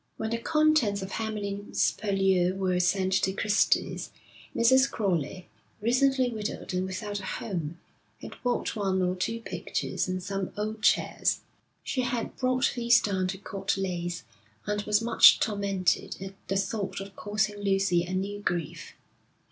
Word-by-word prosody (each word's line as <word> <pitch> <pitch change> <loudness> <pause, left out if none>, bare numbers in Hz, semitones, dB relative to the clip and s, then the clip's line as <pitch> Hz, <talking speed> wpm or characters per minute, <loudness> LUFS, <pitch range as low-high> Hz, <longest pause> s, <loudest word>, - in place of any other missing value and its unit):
When 220 0 -3
the 230 - -1
contents 305 -8 +2
of 190 - -7
Hamlyn's 205 -2 -1
Purlieu 190 -3 +1
were 185 -2 0
sent 185 +1 +1
to 190 - +1
Christy's, 210 +1 +1 0.5
Mrs. 260 +3 +5
Crowley, 185 -3 -2 0.3
recently 255 +2 +2
widowed 215 -4 -5
and 185 +1 0
without 205 +2 -4
a - - -9
home, 170 -8 -4 0.4
had - - -9
bought 245 -1 -1
one 190 -3 0
or 180 0 0
two 230 +5 -2
pictures - - -3
and 185 0 -3
some 195 -1 -3
old 215 +1 -3
chairs. - - +2 0.4
She 260 - -1
had 245 -2 -2
brought 255 0 +1
these 235 -1 +5
down 190 -3 -1
to 190 +1 -4
Court 195 0 -3
Leys, 175 -4 -3 0.4
and 210 0 -1
was 210 +1 +2
much 235 0 +7
tormented 200 -4 0
at 195 0 -7
the 195 - 0
thought 195 -1 -2
of 195 0 -9
causing 210 0 -1
Lucy 195 -3 +2
a 180 +1 -4
new 200 +2 -2
grief. 170 -5 -3
200 Hz, 150 wpm, -28 LUFS, 185-220 Hz, 0.5 s, much